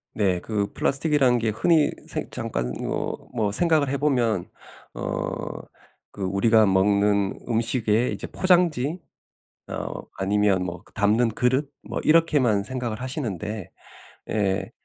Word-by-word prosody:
네. 95 -4 +2
그 105 -1 -2
플라스틱이라는 140 -3 +2
게 115 -1 0
흔히 155 +8 +3 0.2
생 - - -4
잠깐 60 +1 -3
어 - - -2 0.2
뭐 110 -4 0
생각을 155 - +2
해보면 125 -9 +1 0.5
어 - - -4 0.5
그 100 - -7
우리가 105 +4 +4
먹는 100 +1 +2
음식의 115 0 +1
이제 - - -6
포장지 175 -4 +2 0.7
어 - - -5 0.2
아니면 100 -1 +2
뭐 90 0 -6
그 - - -22
담는 110 +3 +2
그릇 130 +5 0 0.2
뭐 - - -3
이렇게만 145 -10 +3
생각을 120 -1 -4
하시는데 110 - -4 0.6
예, 100 -3 0
110 Hz, 245 characters per minute, -24 LUFS, 100-135 Hz, 0.7 s, 우리가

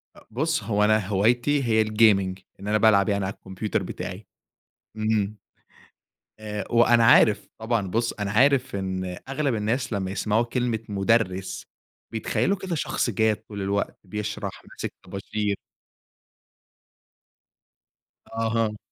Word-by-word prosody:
أ - - -18
بُصّ 155 +7 0
هو 105 -2 +1
أنا 110 -2 +3
هوايتي 120 +8 +2
هي 110 -2 +3
الgaming، 105 -4 +3 0.2
إن 100 - -8
أنا 105 +1 +3
بالعب 105 -2 +4
يعني 100 -1 0
على 95 - -3
الكمبيوتر 95 +2 -3
بتاعي، 90 +2 -6 0.7
إمم 110 -1 0 1.0
آآ، 105 -1 -5
وأنا 120 0 +5
عارف 110 -2 +5
طبعًا، 110 -3 -1
بُصّ 115 +5 0
أنا 100 -1 -1
عارف 130 +1 +3
إن 95 -1 -3
أغلب 140 -1 0
الناس 115 +4 -1
لمّا 95 -3 -2
يسمعوا 105 +3 +1
كلمة 120 -2 -1
مدرّس 100 -2 0 0.5
بيتخيلوا 115 - 0
كده 190 -2 -4
شخص 145 -5 -1
جاد 110 +1 +2
طول 100 -2 -5
الوقت، 100 +1 -1
بيشرح، 105 0 -5
ماسك - - -6
طباشير. 100 +2 -3 2.8
أها. 115 -1 0
110 Hz, 125 wpm, -25 LUFS, 100-115 Hz, 2.8 s, وأنا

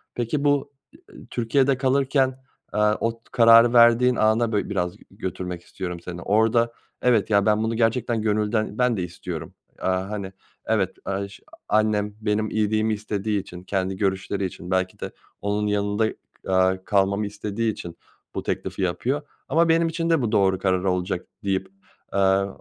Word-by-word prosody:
peki 125 +5 -1
bu 145 -1 +2 0.4
i - - -17
e - - -13
Türkiye'de 130 +3 +2
kalırken, 135 0 +2 0.3
aaa, 105 0 +3
o 115 - +1
t 115 - -19
kararı 115 0 +7
verdiğin 120 +1 +6
ana 110 +1 +2
bö 105 - 0
biraz 90 -2 -2
g - - -19
götürmek 90 -3 -5
istiyorum 90 -1 -6
seni. 85 0 -7
Orada 115 +4 +2 0.3
evet, 115 -4 +3
ya, 100 -1 +3
ben 105 0 +3
bunu 110 +1 0
gerçekten 115 0 +1
gönülden 105 0 0
ben 125 -2 +2
de 95 - -2
istiyorum. 90 -2 -6 0.3
Aaa, 95 +1 -1
hani, 100 -3 -5 0.3
evet 100 -4 0
aş 100 0 -4 0.3
annem 105 -1 +1
benim 110 0 0
iyiliğimi 110 0 +1
istediği 105 0 -2
için 90 -2 -10
kendi 95 0 -2
görüşleri 95 0 -1
için 90 -1 -6
belki 95 0 0
de - - -5 0.3
onun 105 +1 -1
yanında, 105 +1 +1 0.4
aaa, 95 0 +2
kalmamı 100 +1 +1
istediği 105 +2 -2
için 85 -4 -9 0.4
bu - - -3
teklifi - - -3
yapıyor 125 +11 -1 0.3
ama 165 +4 +3
benim 165 0 +3
için 165 0 -2
de 165 -5 +3
bu 115 - -1
doğru 95 -2 +3
karar 95 -1 0
olacak 90 -1 -1 0.2
deyip, 95 -1 -1 0.4
aaa, 95 0 +3
105 Hz, 160 wpm, -24 LUFS, 95-115 Hz, 0.4 s, kararı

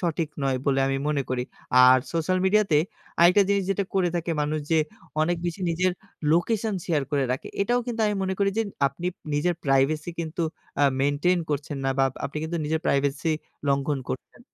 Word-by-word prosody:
সঠিক 165 -3 -1 0.2
নয় 135 -1 +1
বলে 135 -1 +3
আমি 135 0 0
মনে 145 -2 +1
করি। 125 -1 0 0.4
আর 130 0 +8
সোশ্যাল 170 +3 +1
মিডিয়া 210 +2 +4
তে 150 - +6 0.4
আরেকটা 180 +4 +7
জিনিস 200 -1 +2
যেটা 195 0 0
করে 185 -2 +3
থাকে 170 0 -2
মানুষ 150 +1 0
যে 160 - +5 0.4
অনেক 175 +2 +1
বেশি 175 +3 -4
নিজের 180 +2 +1 0.4
লোকেশন 215 +5 +1
শেয়ার 155 -4 +1
করে 140 -2 +1
রাখে 130 - -5
এটাও 245 +4 +1
কিন্তু 230 -2 -3
আমি 210 - 0
মনে 190 0 -1
করি 200 -1 +2
যে - - +4 0.3
আপনি 175 +6 -4 0.2
নিজের 175 +4 +1
প্রাইভেসি 140 +4 +2
কিন্তু 165 +1 -3 0.4
আ - - +4 0.2
মেইনটেইন 145 +6 +2
করছেন 145 0 -2
না 135 - +2
বা 135 - +5 0.2
আপনি 140 - -5
কিন্তু 170 +2 -3
নিজের 160 +1 0
প্রাইভেসি 140 +3 +1 0.4
লঙ্ঘন 140 +1 +1
করছেন। 130 - -6
160 Hz, 185 wpm, -25 LUFS, 140-185 Hz, 0.4 s, আর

